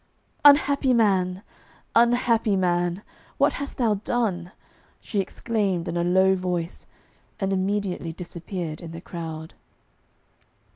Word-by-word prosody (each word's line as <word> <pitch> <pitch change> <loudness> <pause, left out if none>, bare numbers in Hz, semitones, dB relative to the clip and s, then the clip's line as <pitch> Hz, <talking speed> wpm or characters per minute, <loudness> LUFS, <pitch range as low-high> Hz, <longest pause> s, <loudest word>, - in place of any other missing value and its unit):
'Unhappy 285 -2 +5
man! 190 -4 +2 0.5
Unhappy 235 -2 +3
man! 175 0 0 0.3
What - - +3
hast 280 - -6
thou 230 -4 +2
done?' 200 -4 -2 0.5
she 210 - -3
exclaimed 195 -3 -1
in - - -3
a 170 - +1
low 190 +2 +4
voice, 180 -2 -3 0.5
and 195 -1 0
immediately 190 -3 -1
disappeared 170 -1 -6
in 165 -1 -8
the 165 - -7
crowd. 160 -2 -7
190 Hz, 110 wpm, -25 LUFS, 175-220 Hz, 0.5 s, Unhappy